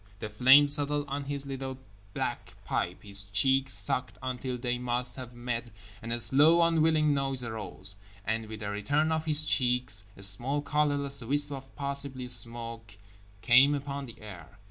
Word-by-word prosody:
The 110 - -6
flame 130 +7 +6
settled 145 0 +1
on 140 +1 -4
his 140 0 -4
little 135 -1 -6 0.4
black - - -4
pipe, 90 - -3
his 100 -1 -1
cheeks 130 +7 +1
sucked 105 +5 -1
until 130 0 -4
they 125 0 -2
must 125 0 -2
have 125 -2 -9
met, 120 -1 -4 0.3
and 115 - -6
a 120 - 0
slow 155 +8 +5
unwilling 160 -2 +2
noise 135 -2 -1
arose, 105 -3 -1 0.3
and 110 +1 -2
with 110 0 -9
the 100 -1 -4
return 145 +10 0
of 160 0 -2
his 155 0 +5
cheeks 125 -6 +1
a 100 - -1
small 120 +9 +3
colorless 145 -2 -1
wisp 145 +4 +1
of 135 -1 -9
possibly 140 -2 -1
smoke 115 -2 0 0.5
came 130 +5 +5
upon 140 -1 -6
the 115 - -11
air. 100 -2 -12
130 Hz, 165 wpm, -28 LUFS, 115-145 Hz, 0.5 s, flame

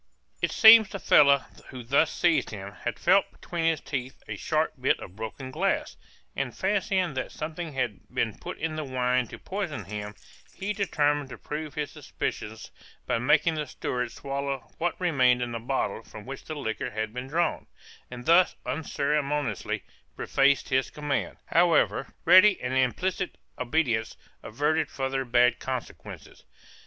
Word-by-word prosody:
It - - +1
seems 220 -2 +9
the - - -5
fellow 140 -6 +5 0.2
who 125 -2 -8
thus 140 +6 +3
seized 170 -2 +2
him, 100 -2 -7
had - - -5
felt - - +3
between 170 -2 -4
his 165 -2 +2
teeth 130 -2 -5
a - - -4
sharp - - 0
bit - - +2
of 90 - -10
broken 110 +5 -6
glass, - - -1 0.4
and 135 -3 -3
fancying 190 -4 0
that 130 - -4
something 160 +1 -5
had 125 -6 -2
been - - -1
put - - -7
in 160 0 -3
the 155 - -2
wine 125 -2 0
to - - -9
poison - - -4
him, 105 0 -6 0.4
he 200 +2 -3
determined 145 -8 0
to - - -8
prove 150 0 -6
his 150 -2 -3
suspicions 110 +1 -5 0.3
by - - 0
making 150 +6 +3
the 150 -2 -3
steward 125 -2 -3
swallow 140 -2 -4
what 175 0 -1
remained 130 -8 +3
in 120 - -4
the 115 - -3
bottle 115 -3 -2
from 110 -1 -12
which 135 +1 -8
the 155 - -5
liquor 110 -4 -3
had 110 -1 -4
been 125 +1 -5
drawn, 170 +5 -1 0.4
and 125 0 -9
thus 170 +2 +5
unceremoniously 145 - -1 0.3
prefaced 140 0 +2
his 130 -1 +1
command; 145 -3 -3
however, 170 0 +3 0.2
ready 185 +3 +7
and 125 +1 -3
implicit 130 - 0 0.2
obedience 120 -4 0 0.2
averted 150 +7 0
further 135 0 -2
bad 125 0 +3
consequences. 125 - -7
140 Hz, 155 wpm, -27 LUFS, 125-160 Hz, 0.4 s, seems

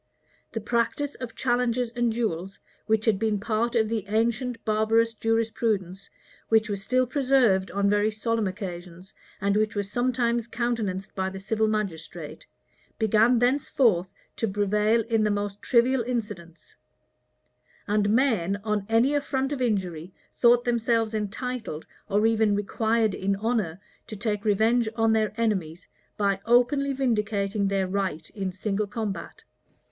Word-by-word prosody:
The 225 - -3
practice 235 +6 -1
of 240 -3 -6
challenges 245 -1 0
and 240 -1 0
duels, 195 -4 -3 0.3
which 220 -1 +1
had 215 -4 +2
been 215 -2 0
part 230 +3 -1
of 220 -2 +3
the 220 -2 -2
ancient 230 +3 -1
barbarous 225 +1 +2
jurisprudence, 220 -4 -1 0.4
which 220 -1 +3
was 200 -1 -3
still 255 +5 +2
preserved 250 -8 +2
on 200 +2 0
very 205 +1 +3
solemn 225 0 -1
occasions, 180 -1 -7 0.3
and 200 +1 +1
which 215 +1 +1
was 205 0 -3
sometimes 240 -2 0
countenanced 225 -6 -2
by 190 -1 -2
the 190 0 -8
civil 220 +2 0
magistrate, 200 -7 -4 0.5
began 220 +2 +4
thenceforth 245 -7 +2 0.3
to 225 - 0
prevail 210 +3 +2
in 225 -1 0
the 210 - +2
most 205 0 -2
trivial 255 +1 +3
incidents; 205 -10 -5 1.1
and 205 0 +1
men, 210 -6 +2
on 210 -2 -1
any 230 +5 +3
affront 280 -1 -1
or 265 - -4
injury, 185 -7 -1 0.2
thought 240 0 +5
themselves 230 -2 +1
entitled, 220 - -4 0.2
or 205 +2 +2
even 220 -2 +3
required 220 +1 0
in 195 +1 -1
honor, 205 -5 -1 0.3
to 215 - -7
take 210 0 -2
revenge 220 +3 +3
on 225 -1 +3
their 215 -1 +1
enemies, 185 -7 -1 0.3
by 200 -2 +1
openly 260 +4 +3
vindicating 210 -6 0
their 195 -1 0
right 185 -5 -3
in 195 -3 -3
single 200 +2 -2
combat. 210 -1 -5
220 Hz, 140 wpm, -26 LUFS, 200-235 Hz, 1.1 s, thought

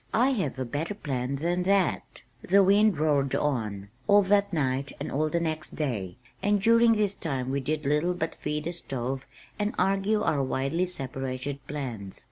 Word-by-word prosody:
I 245 +4 +4
have 185 - -1
a 130 - -2
better 155 - -3
plan 135 -6 -2
than 170 +5 0
that." 195 0 0 0.2
The 195 +2 +4
wind 205 +1 +4
roared 145 -3 +2
on, 110 -9 -1 0.2
all 205 0 +6
that 200 +1 +2
night 140 -4 0
and - - -4
all 155 +3 +1
the 170 - 0
next 160 -2 -3
day, 110 - -3 0.2
and 205 0 +2
during 230 +2 +5
this 210 -2 +1
time 135 -8 -3
we 140 - 0
did 150 +2 -2
little 150 +5 +1
but 160 -2 -2
feed 150 0 -3
the 170 - -2
stove 135 -4 -4 0.3
and 210 0 -1
argue 195 +3 +2
our 145 -8 +1
widely 135 +7 0
separated 135 -3 -4
plans. 120 -10 -5
155 Hz, 175 wpm, -27 LUFS, 135-195 Hz, 0.3 s, all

